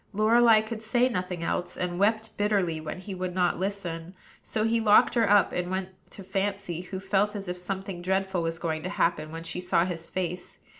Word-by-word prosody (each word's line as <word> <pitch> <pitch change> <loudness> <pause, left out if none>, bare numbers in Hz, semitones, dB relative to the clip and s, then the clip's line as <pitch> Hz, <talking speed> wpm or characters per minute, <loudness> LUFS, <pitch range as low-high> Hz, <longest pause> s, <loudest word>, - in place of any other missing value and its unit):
Lorelei 220 +1 +5
could 220 0 -6
say 240 +3 +2
nothing 180 -5 -3
else, 175 +1 -2
and 180 -1 -2
wept 220 +2 +1
bitterly 195 -6 +1
when 160 +4 -6
he 195 +1 -7
would 185 -1 -4
not 180 -2 +1
listen; 185 -3 -4 0.3
so 215 - -2
he 225 +1 +2
locked 210 -1 +5
her 230 -4 +3
up 205 -1 +5
and 180 0 -2
went 185 0 -2 0.2
to 195 - -11
Fancy, 195 -2 -2
who 185 +1 -6
felt 195 +2 +1
as 200 -2 -5
if 180 - -2
something 190 0 -5
dreadful 190 0 0
was 165 0 -2
going 160 -1 -2
to 180 - -4
happen 165 -5 0
when 165 0 -6
she 180 - -4
saw 180 -1 +2
his 170 -3 -5
face. 180 -1 -4
190 Hz, 205 wpm, -27 LUFS, 175-205 Hz, 0.3 s, Lorelei